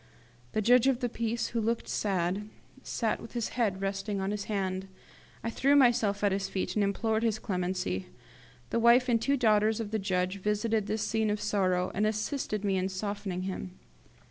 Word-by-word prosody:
The 215 - 0
judge 245 +3 +5
of 265 -3 +2
the 245 -2 -1
peace, 230 0 -2
who 230 - -1
looked 230 +1 -1
sad, 195 +1 -1 0.3
sat 225 -4 -1
with 225 - -10
his 235 -2 -2
head 205 -6 -1
resting 195 +1 -2
on 190 +1 -1
his 205 -1 -3
hand. 190 -2 -2 0.6
I 230 - -2
threw 275 +4 +3
myself 230 -7 +3
at 205 - +4
his 195 0 -1
feet 190 - -2
and 210 - +2
implored 220 +2 0
his 225 -2 +1
clemency. 180 - -2 0.6
The - - +1
wife 235 +2 +5
and 235 -2 +3
the - - -6
two 280 0 +2
daughters 215 -2 +3
of 215 -2 -4
the 220 - 0
judge 185 0 -1
visited 210 +1 0
this 215 0 -1
scene 220 -1 0
of 210 0 0
sorrow, 185 -4 +1
and 210 +2 +1
assisted 215 -1 -2
me 195 -1 +1
in 185 +1 0
softening 195 -1 -3
him. 185 -1 -5
210 Hz, 195 wpm, -30 LUFS, 195-230 Hz, 0.6 s, judge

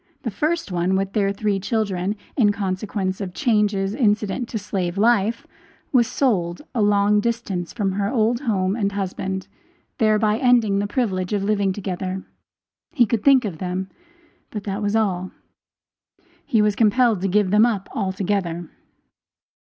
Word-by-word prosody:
The 230 - -2
first 305 - -1
one, 180 +2 +1
with 195 0 -1
their 200 -2 +1
three 200 0 -1
children, 200 -2 -1 0.2
in 215 -7 +4
consequence 190 0 -3
of 185 -2 -5
changes 210 -6 +1
incident 215 -1 0
to 225 - -3
slave 190 -3 -3
life, 225 +1 +2 0.5
was 240 -3 +4
sold 180 -7 0
a 235 - 0
long 205 0 +3
distance 205 -6 -2
from 205 -5 -1
her 200 +1 -1
old 235 -1 +1
home 200 -7 0
and 200 -3 -1
husband, 190 -1 -3 0.5
thereby 215 -1 +3
ending 235 -6 +3
the 205 - -1
privilege 200 -6 -1
of 200 -1 0
living 200 -1 +1
together; 190 -1 -4 0.7
he 265 -8 +3
could 220 -1 -1
think 270 -3 +5
of 175 -7 -5
them, 185 +1 -3 0.6
but 210 -2 -6
that 200 +1 -3
was 205 +1 0
all; 185 -4 0 1.2
he 220 -3 +3
was 210 -1 +2
compelled 225 -2 +3
to 195 - 0
give 195 0 +2
them 210 +3 +5
up 205 -5 -2
altogether. 190 -3 -2
205 Hz, 150 wpm, -22 LUFS, 190-220 Hz, 1.2 s, think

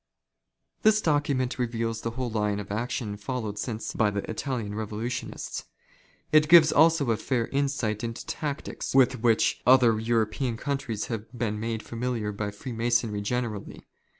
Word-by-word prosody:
This 215 0 +5
document 145 -7 0
reveals 115 -2 -1
the 115 - -2
whole 125 -2 -2
line 105 -2 0
of 100 -1 -7
action 110 -1 -3
followed 105 -1 -4
since 110 0 -4
by 110 - +2
the 100 -1 -3
Italian 115 -3 -3
Revolutionists. 110 +3 -4 0.7
It 155 0 +5
gives 165 -2 +8
also 155 -4 +4
a 110 - +1
fair 120 -1 0
insight 135 -6 -1
into 115 0 -5
tactics 145 -3 -4
with 130 -2 +4
which 115 -2 +2
other 125 -4 +6
European 115 +1 0
countries 130 -6 -3
have 115 -1 -5
been 110 -3 -1
made 115 0 -3
familiar 115 -3 -3
by 105 0 -3
Freemasonry 115 -1 -1
generally. 110 -1 -3
115 Hz, 145 wpm, -27 LUFS, 110-130 Hz, 0.7 s, gives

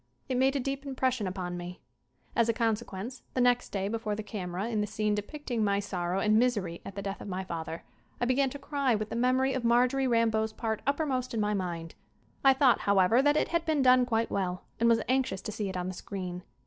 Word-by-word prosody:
It 260 - -1
made 265 +2 +3
a - - +1
deep 275 +1 -3
impression 260 -5 -1
upon 180 -1 -4
me. 175 +1 -7 0.6
As 235 -1 +3
a - - +3
consequence, 225 0 -2
the - - +1
next 245 0 +3
day 195 -1 -2
before 220 -1 -2
the 215 - -5
camera 195 -1 -4
in 220 -3 0
the 210 - -1
scene 215 0 0
depicting 235 +2 -3
my 200 -1 +2
sorrow 185 -2 -2
and 215 +2 +4
misery 205 -9 0
at 195 - -8
the 200 - -4
death 195 0 -4
of - - -7
my 190 -1 -3
father, 165 -2 -5 0.4
I 245 - +1
began 265 +2 +2
to 285 - -7
cry 280 -3 0
with 215 0 -3
the - - -2
memory 255 +2 +2
of 260 - -2
Marjorie 250 +3 +3
Rambeau's 220 -2 +2
part 220 -1 -2
uppermost 275 -4 0
in - - 0
my 210 0 +1
mind. 170 -4 -3 0.5
I 270 -1 +7
thought, 265 -2 +4
how 200 0 +2
ever, 195 +7 +5
that 290 +2 +3
it - - +1
had 335 -1 +1
been 310 -4 +1
done 255 -1 +5
quite 225 -1 0
well 185 -2 -2 0.2
and 235 +1 +4
was 230 -1 +3
anxious 260 -6 +1
to - - -4
see 205 -1 -3
it 185 - -4
on 180 0 -2
the 185 - -3
screen. 180 -1 -6
225 Hz, 235 wpm, -29 LUFS, 195-255 Hz, 0.6 s, I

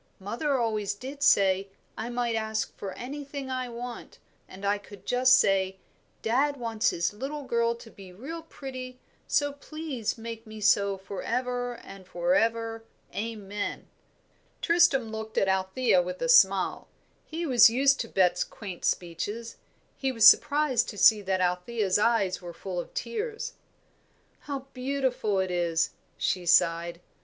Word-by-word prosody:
Mother 240 +9 -1
always 215 -4 -1
did 270 +6 -8
say, 195 -5 +4 0.3
I 225 - -5
might 240 -1 -1
ask 220 -1 -2
for 195 -2 -6
anything 280 +1 -6
I 255 -1 -2
want; 240 +1 -8 0.3
and 195 +2 -9
I 205 +1 +1
could 200 -1 -14
just 255 +1 +5
say, 190 -1 +2 0.5
'Dad 275 +6 +1
wants 230 -3 0
his 170 +4 -1
little 275 +7 -5
girl 235 -2 +1
to 235 -1 -13
be 190 -2 -13
real 280 - -7
pretty, 255 -5 -8 0.3
so 290 -1 +1
please 285 -6 -4
make 230 0 -8
me 215 0 -9
so 200 -1 +3
for 190 0 -7
ever 245 0 -2
and 195 -4 -12
for 175 0 0
ever. 225 +1 0 0.3
Amen.'" 210 -2 -4 0.7
Tristram 335 -9 +3
looked 220 0 -6
at 195 - +3
Althea 190 +2 +2
with 180 +1 -5
a 245 - 0
smile; 195 -5 +4 0.4
he 330 +2 -5
was 245 -7 +7
used 270 +4 +3
to 230 - -2
Bet's 180 -4 +2
quaint 190 -5 -9
speeches. 205 +7 -2 0.4
He 270 -1 -1
was 225 -3 +6
surprised 285 -2 +4
to 205 - -8
see 215 +1 +6
that 190 -1 -1
Althea's 185 +3 0
eyes 200 -5 +2
were 175 -1 -9
full 185 -2 -5
of - - -6
tears. 460 -2 -4 0.9
"How 275 -2 -6
beautiful 255 -5 -1
it 190 -1 0
is!" 170 -2 +1 0.3
she 180 -2 -1
sighed. 170 0 +3
225 Hz, 150 wpm, -28 LUFS, 195-255 Hz, 0.9 s, was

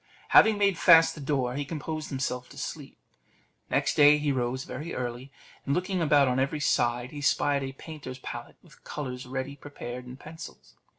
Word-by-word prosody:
Having 220 -1 +6
made 200 -3 +2
fast 165 -2 +7
the 150 - -10
door, 135 -3 -1
he 145 +2 -2
composed 155 +1 -5
himself 130 -2 -3
to - - -14
sleep. - - -7 0.7
Next - - +1
day 150 0 +7
he 150 -1 0
rose 130 0 -1
very 155 +6 -6
early, 125 +2 -5 0.3
and 140 - 0
looking 185 0 -1
about 145 -3 +4
on 125 0 +1
every 140 +3 0
side, 120 -3 +1
he 145 - -7
spied 145 0 +2
a 135 0 -5
painter's 140 -3 -9
pallet, 120 -2 -8
with 170 -4 -20
colours 130 -3 -6
ready 135 +2 -4
prepared 125 -3 -8
and 125 +2 -10
pencils. 155 - -11
140 Hz, 180 wpm, -28 LUFS, 125-150 Hz, 0.7 s, fast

